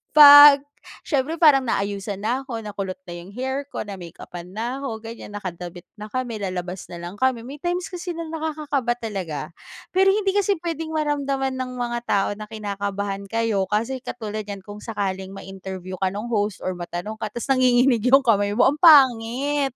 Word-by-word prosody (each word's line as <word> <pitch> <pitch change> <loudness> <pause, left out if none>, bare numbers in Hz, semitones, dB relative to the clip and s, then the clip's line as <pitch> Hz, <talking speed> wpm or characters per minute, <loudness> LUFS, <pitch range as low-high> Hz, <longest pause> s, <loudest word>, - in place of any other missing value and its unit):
'pag 290 -1 +10 0.4
siyempre 285 +1 -1
parang 290 -6 +5
naayusan 200 -1 -2
na'ko, 245 +1 -2
nakulot 195 -3 -5
na 175 - -10
'yong 175 +2 -9
hair 265 +3 -3
ko, 290 - -5
na-makeupan 175 -3 -9
na'ko, 240 +1 -4
ganyan, 225 -2 -9
nakadamit 175 -3 -7 0.2
na 210 - -7
kami, 240 -1 -4
lalabas 185 -2 -5
na - - -9
lang 175 +3 -7
kami. 260 -3 +1
May 275 +5 -9
times 350 +3 -2
kasi 355 -1 -5
nakakakaba 310 -6 -2
talaga. 195 -10 -4 0.5
Pero 380 +1 +3
hindi 400 -2 +1
kasi 405 0 +2
puwedeng 325 -1 -4
maramdaman 280 -3 -1
ng 255 -1 -4
mga 240 -1 -2
tao 195 -1 +2
na 210 +1 -9
kinakabahan 200 -2 -4
kayo, 220 -3 0
kasi 230 +6 -1
katulad 215 -4 -6
niyan 200 -2 -7
kung 205 +1 -10
sakaling 195 -3 -4
ma-interview 190 -1 -8
ka 190 - +1
no'ng 230 +4 -5
host 205 -2 -1
or 185 - -1
matanong 175 +5 -6
ka, 215 - -2
tapos 240 - -5
nanginginig 250 -2 +3
'yong 270 +2 +6
kamay 205 -3 +2
mo, 255 +3 +5
am 295 - -6
pangit. 270 -2 +4
230 Hz, 165 wpm, -23 LUFS, 200-275 Hz, 0.5 s, pag